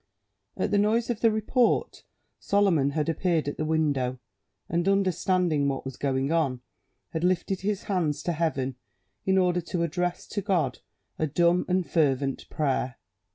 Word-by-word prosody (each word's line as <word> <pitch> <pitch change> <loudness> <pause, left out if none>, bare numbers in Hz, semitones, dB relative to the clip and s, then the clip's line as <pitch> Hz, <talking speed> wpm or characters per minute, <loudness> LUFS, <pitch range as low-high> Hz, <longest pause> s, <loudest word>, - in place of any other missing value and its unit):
At 185 - -1
the 205 - +3
noise 225 +4 +2
of 225 - -3
the 230 - +4
report 220 +3 +1 0.3
Solomon 190 -9 +2
had 150 +2 -1
appeared 165 -1 0
at 145 - -3
the 155 - -1
window, 145 -5 0 0.5
and, 170 +2 0
understanding 185 -5 +2
what 135 -1 -2
was 135 -1 -5
going 135 +1 -1
on, 140 -7 +1 0.5
had 160 0 -2
lifted 180 +1 0
his 205 0 -1
hands 160 -6 -1
to 175 - 0
heaven, 135 -6 -1 0.5
in 190 0 +4
order 180 -1 +2
to 170 0 -2
address 175 +2 -2
to 205 - -2
God 170 -11 0 0.4
a 155 - +1
dumb 170 +4 +2
and 180 -1 +1
fervent 140 -4 0
prayer. 130 -4 -1
170 Hz, 155 wpm, -27 LUFS, 145-185 Hz, 0.5 s, the